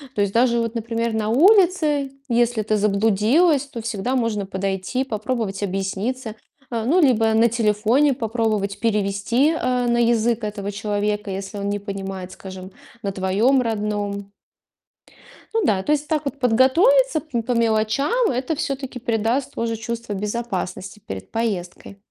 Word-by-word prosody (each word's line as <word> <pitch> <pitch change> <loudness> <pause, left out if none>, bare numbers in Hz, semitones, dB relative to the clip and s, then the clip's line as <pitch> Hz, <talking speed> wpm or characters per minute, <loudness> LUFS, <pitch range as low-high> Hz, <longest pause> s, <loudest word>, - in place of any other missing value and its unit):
То 205 - +1
есть 200 -1 +1
даже 235 0 +3
вот 230 -1 -2
например, 230 0 -2
на 215 -1 -1
улице, 320 - +4 0.2
если 240 -1 +2
ты 215 0 0
заблудилась, 220 - +3
то 245 -5 -7
всегда 225 +3 -2
можно 230 -5 0
подойти, 195 +5 -2
попробовать 215 -4 -3
объясниться. 205 +5 -3 0.3
А, 230 -2 -2
ну, 335 +8 +3
либо 225 -7 +3
на 225 +1 +5
телефоне 230 +5 +2
попробовать 220 -4 -1
перевести, 220 +5 +1
а, 250 -1 0
на 235 0 +2
язык 235 -1 +2
этого 205 -1 -4
человека, 205 0 -2
если 195 +1 -5
он 200 0 -2
не 205 0 -1
понимает, 195 -2 -6
скажем, 190 0 -9 0.3
на 200 -3 -2
твоём 195 +8 +2
родном. 205 -2 -3 1.2
Ну 450 - +2
да, 195 - +1
то 295 - -1
есть 300 0 0
так 305 -1 -1
вот 280 0 -4
подготовиться 315 - +4
пм 250 -6 -3
по 250 - -3
мелочам 235 - +1
это 255 +5 -2
все-таки 270 -2 -4
придаст 230 +3 -1
тоже 230 0 -2
чувство 225 -1 -5
безопасности 205 -2 -4
перед 95 -1 -7
поездкой. 200 -3 -3
225 Hz, 145 wpm, -22 LUFS, 205-255 Hz, 1.2 s, на